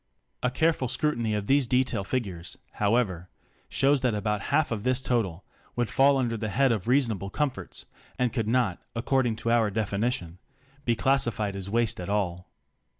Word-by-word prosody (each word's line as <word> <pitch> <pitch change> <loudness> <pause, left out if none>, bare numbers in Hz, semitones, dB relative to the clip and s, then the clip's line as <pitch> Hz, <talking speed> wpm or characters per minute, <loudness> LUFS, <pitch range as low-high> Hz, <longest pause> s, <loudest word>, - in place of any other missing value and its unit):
A 125 - +2
careful 155 0 +1
scrutiny 120 -6 0
of 105 -1 -2
these 135 +2 +3
detail 125 -5 +1
figures, 95 -7 -4 0.2
however, 100 -5 +1 0.4
shows 135 0 +2
that 125 -4 +1
about 105 0 -1
half 150 0 +2
of 110 -3 -2
this 125 +3 +1
total 105 -9 -1 0.3
would 120 -2 -1
fall 140 +1 +5
under 120 -3 0
the 110 0 -3
head 135 +5 +3
of 110 -3 -2
reasonable 115 -7 +1
comforts, 130 - -3 0.3
and 125 -3 0
could 115 -4 -1
not, 115 -6 +1 0.2
according 120 0 +1
to 115 +1 -2
our 115 -3 +3
definition, 100 -4 -2 0.5
be 120 - +2
classified 115 -6 +1
as 100 0 -4
waste 115 0 +1
at 90 - -5
all. 90 -3 -1
115 Hz, 165 wpm, -27 LUFS, 100-130 Hz, 0.5 s, fall